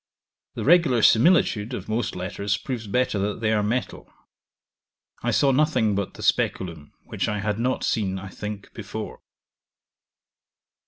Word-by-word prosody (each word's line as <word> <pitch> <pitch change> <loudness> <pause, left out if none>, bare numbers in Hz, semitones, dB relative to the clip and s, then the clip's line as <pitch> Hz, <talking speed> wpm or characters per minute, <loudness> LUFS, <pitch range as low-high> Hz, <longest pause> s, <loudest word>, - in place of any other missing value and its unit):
The - - -4
regular 155 -7 +4
similitude 120 - +4
of 100 - -7
most 110 0 -2
letters 100 +3 -2
proves 120 -5 -5
better 125 -1 0
that 100 +1 -2
they 110 -1 +1
are 105 - +2
metal. 115 +5 -3 1.1
I - - -1
saw 140 - +3
nothing 130 -6 +2
but 100 -1 -3
the - - -9
Speculum 85 -5 0
which - - -3
I 105 - -1
had 105 +1 -2
not 125 +2 0
seen, 95 -4 0
I 95 0 -7
think, 105 +1 -7
before. - - -7
105 Hz, 145 wpm, -24 LUFS, 100-125 Hz, 1.1 s, regular